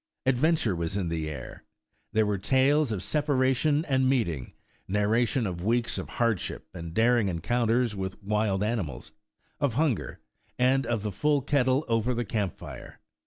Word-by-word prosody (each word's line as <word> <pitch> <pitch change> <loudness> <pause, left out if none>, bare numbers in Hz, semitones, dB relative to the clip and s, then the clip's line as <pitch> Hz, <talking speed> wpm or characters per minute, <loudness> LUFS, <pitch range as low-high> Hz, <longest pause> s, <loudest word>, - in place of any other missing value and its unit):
Adventure 130 - +2
was 85 +3 -2
in 90 -4 -1
the 80 -2 -2
air. 75 - -8 0.5
There 110 0 +3
were 105 -2 -1
tales 135 +5 +3
of 95 -4 -3
separation 145 - +1
and 130 -2 +2
meeting; 85 - -1 0.3
narration 110 +5 +1
of 90 -3 -4
weeks 115 +3 +1
of - - -6
hard 115 -5 +1
ship - - -6
and 85 -2 -7
daring 115 -1 +3
encounters 115 +7 +1
wdth 95 -1 -4
wild 105 -1 0
animals; 105 - -3 0.5
of 140 -6 0
hun 150 -3 +3
ger, - - -8 0.4
and 130 0 +2
of 115 -3 -1
the 105 - -2
full 145 +8 +1
kettle 135 +1 +2
over 115 +1 +1
the 120 0 -1
camp 100 -3 -2
fire. - - -10
115 Hz, 165 wpm, -27 LUFS, 100-130 Hz, 0.5 s, There